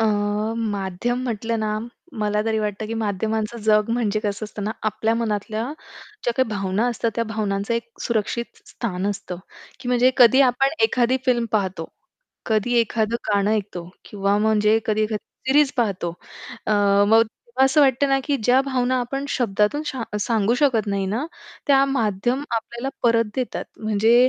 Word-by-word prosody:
अ, 225 Hz, -, +3 dB, 0.5 s
माध्यम 210 Hz, +3 st, -2 dB
म्हटलं 230 Hz, -1 st, -2 dB
ना, 215 Hz, 0 st, -1 dB, 0.4 s
मला 210 Hz, 0 st, +1 dB
तरी 220 Hz, -1 st, 0 dB
वाटतं, 210 Hz, 0 st, -3 dB
की 225 Hz, -, -4 dB
माध्यमांचं 220 Hz, +1 st, -2 dB
जग 215 Hz, 0 st, +3 dB
म्हणजे 220 Hz, -3 st, 0 dB
कसं 210 Hz, 0 st, -3 dB
असतं 210 Hz, -1 st, -6 dB
ना, 215 Hz, -, -1 dB
आपल्या 220 Hz, +1 st, 0 dB
मनातल्या 215 Hz, -1 st, -2 dB, 0.6 s
ज्या 240 Hz, -, +1 dB
काही 260 Hz, -2 st, +2 dB
भावना 200 Hz, +1 st, -1 dB
असतात, 230 Hz, -1 st, -1 dB
त्या 230 Hz, 0 st, 0 dB
भावनांचं 210 Hz, 0 st, -2 dB
एक 235 Hz, 0 st, -3 dB
सुरक्षित 235 Hz, +1 st, -1 dB, 0.2 s
स्थान 190 Hz, -4 st, -3 dB
असतं, 190 Hz, -3 st, -6 dB, 0.4 s
की 250 Hz, -, -6 dB
म्हणजे 250 Hz, +1 st, +4 dB
कधी 260 Hz, +1 st, +7 dB
आपण 260 Hz, +1 st, +4 dB, 0.2 s
एखादी 250 Hz, -, +2 dB
फिल्म 240 Hz, -2 st, +2 dB
पाहतो. 190 Hz, -6 st, -1 dB, 0.6 s
कधी 220 Hz, +2 st, +1 dB
एखादं 225 Hz, 0 st, 0 dB
गाणं 205 Hz, 0 st, +2 dB
ऐकतो, 195 Hz, -5 st, -2 dB, 0.2 s
किंवा 200 Hz, 0 st, 0 dB
म्हणजे 215 Hz, 0 st, +3 dB
कधी 215 Hz, 0 st, +1 dB
एखादी 215 Hz, -1 st, -2 dB, 0.2 s
सीरीज 285 Hz, +1 st, +4 dB
पाहतो. 195 Hz, -7 st, 0 dB, 0.5 s
अ, -, -, +2 dB, 0.4 s
मग 225 Hz, +1 st, +6 dB, 0.3 s
तेव्हा 265 Hz, -, +5 dB
असं 270 Hz, +3 st, +4 dB
वाटतं 275 Hz, 0 st, +3 dB
ना, 270 Hz, 0 st, +3 dB
की 285 Hz, -2 st, +1 dB
ज्या 250 Hz, +3 st, +5 dB
भावना 255 Hz, -2 st, 0 dB
आपण 270 Hz, +3 st, -3 dB
शब्दातून 225 Hz, +2 st, +1 dB
शा 265 Hz, -4 st, -3 dB, 0.2 s
सांगू 220 Hz, +1 st, +1 dB
शकत 250 Hz, -7 st, +3 dB
नाही 200 Hz, -1 st, -1 dB
ना, 220 Hz, +9 st, -1 dB, 0.4 s
त्या 275 Hz, -1 st, +5 dB
माध्यमं 240 Hz, +1 st, 0 dB
आपल्याला 235 Hz, +3 st, -4 dB
परत 230 Hz, -1 st, +4 dB
देतात. 255 Hz, -2 st, -2 dB, 0.2 s
म्हणजे 225 Hz, +3 st, +4 dB
225 Hz, 160 wpm, -22 LUFS, 210-245 Hz, 0.6 s, कधी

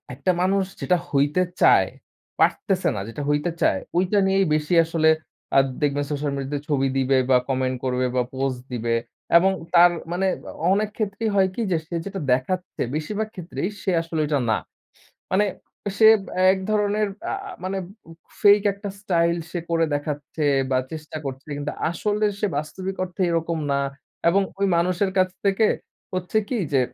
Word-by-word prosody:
একটা 145 Hz, +8 st, +1 dB
মানুষ 195 Hz, +1 st, +2 dB, 0.2 s
যেটা 180 Hz, -, +2 dB
হইতে 145 Hz, +5 st, +2 dB, 0.2 s
চায়, -, -, +6 dB, 0.5 s
পারতেছে 190 Hz, -3 st, +2 dB
না, -, -, -3 dB
যেটা 130 Hz, +6 st, -6 dB
হইতে 145 Hz, +3 st, +1 dB
চায়, -, -, +3 dB, 0.2 s
ঐটা 190 Hz, +3 st, +3 dB
নিয়েই 195 Hz, 0 st, +3 dB
বেশি 150 Hz, +3 st, -1 dB
আসলে 160 Hz, -1 st, +2 dB, 0.5 s
আ -, -, +9 dB, 0.2 s
দেখবেন 145 Hz, -1 st, +1 dB
সোশ্যাল 145 Hz, 0 st, -1 dB
মিডিয়াতে 140 Hz, +1 st, -3 dB
ছবি 135 Hz, -2 st, +2 dB
দিবে 135 Hz, 0 st, +3 dB
বা 130 Hz, -, +6 dB
কমেন্ট 130 Hz, -1 st, 0 dB
করবে 130 Hz, -1 st, 0 dB
বা 125 Hz, -, +3 dB
পোস্ট 130 Hz, -1 st, -2 dB
দিবে। 115 Hz, -1 st, 0 dB, 0.4 s
এবং 190 Hz, +3 st, +4 dB, 0.2 s
তার 175 Hz, +1 st, +8 dB, 0.2 s
মানে 185 Hz, +2 st, 0 dB, 0.5 s
অনেক 210 Hz, +1 st, +1 dB
ক্ষেত্রেই 215 Hz, +1 st, -1 dB
হয় 190 Hz, -1 st, +4 dB
কি -, -, -2 dB
যে, 170 Hz, -, +3 dB
সে 170 Hz, -, -5 dB
যেটা 195 Hz, -1 st, -5 dB
দেখাচ্ছে 180 Hz, +9 st, -2 dB
বেশিরভাগ 210 Hz, +8 st, -2 dB
ক্ষেত্রেই 180 Hz, +1 st, -4 dB
সে 190 Hz, -, 0 dB
আসলে 165 Hz, -1 st, -4 dB
ঐটা 145 Hz, -1 st, +1 dB
না। -, -, +4 dB, 0.8 s
মানে 205 Hz, +3 st, +4 dB, 0.5 s
সে 220 Hz, -, +7 dB, 0.5 s
এক 190 Hz, -, -1 dB
ধরনের 210 Hz, 0 st, +1 dB, 0.3 s
আ -, -, 0 dB, 0.3 s
মানে 190 Hz, +1 st, -2 dB, 0.6 s
ফেক 205 Hz, 0 st, +7 dB
একটা 200 Hz, +1 st, -7 dB
স্টাইল 170 Hz, -4 st, +2 dB
সে 175 Hz, -, -3 dB
করে 165 Hz, 0 st, +3 dB
দেখাচ্ছে, 145 Hz, +1 st, -3 dB, 0.3 s
বা 130 Hz, -, +3 dB
চেষ্টা 155 Hz, -1 st, -7 dB
করছে। 135 Hz, +1 st, -6 dB
কিন্তু 145 Hz, +1 st, -3 dB, 0.2 s
আসলে 210 Hz, +4 st, -1 dB, 0.2 s
সে -, -, +2 dB
বাস্তবিক 185 Hz, +6 st, -4 dB
অর্থে 185 Hz, +1 st, -4 dB
এরকম 165 Hz, 0 st, 0 dB
না। 140 Hz, -, +2 dB, 0.5 s
এবং 195 Hz, +4 st, +4 dB, 0.2 s
ওই 200 Hz, -, +3 dB
মানুষের 185 Hz, +3 st, +1 dB
কাছ 185 Hz, 0 st, +4 dB, 0.2 s
থেকে 200 Hz, +2 st, +3 dB, 0.5 s
হচ্ছে 185 Hz, +4 st, 0 dB
কি 250 Hz, -, -1 dB
যে, 135 Hz, -, +4 dB
170 Hz, 165 wpm, -23 LUFS, 145-195 Hz, 0.8 s, আ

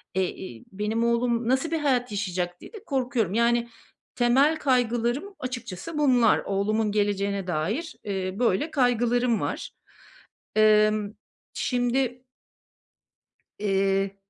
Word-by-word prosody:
Eee, 185 Hz, -1 st, +1 dB
iii, 120 Hz, -12 st, -10 dB
benim 210 Hz, +4 st, -1 dB
oğlum 235 Hz, 0 st, +1 dB
nasıl 265 Hz, +5 st, +1 dB
bir 325 Hz, -, 0 dB
hayat 250 Hz, -6 st, +1 dB
yaşayacak 180 Hz, -3 st, -3 dB
diye -, -, -12 dB
de 435 Hz, -, -10 dB
korkuyorum. 245 Hz, -, -1 dB
Yani, 235 Hz, 0 st, +2 dB, 0.5 s
temel 270 Hz, +6 st, +3 dB
kaygılarım 245 Hz, -, 0 dB
açıkçası 250 Hz, -, -6 dB
bunlar. 250 Hz, -6 st, +4 dB
Oğlumun 210 Hz, +2 st, 0 dB
geleceğine 200 Hz, -2 st, 0 dB
dair, 190 Hz, -, -2 dB
eee, 190 Hz, -2 st, -2 dB
böyle, 250 Hz, -, +1 dB
kaygılarım 245 Hz, -2 st, +2 dB
var. -, -, -4 dB, 0.8 s
Emm, 215 Hz, -1 st, +4 dB, 0.4 s
şimdi 250 Hz, 0 st, -1 dB, 1.3 s
Eee 195 Hz, -1 st, 0 dB
235 Hz, 110 wpm, -26 LUFS, 200-250 Hz, 1.3 s, bunlar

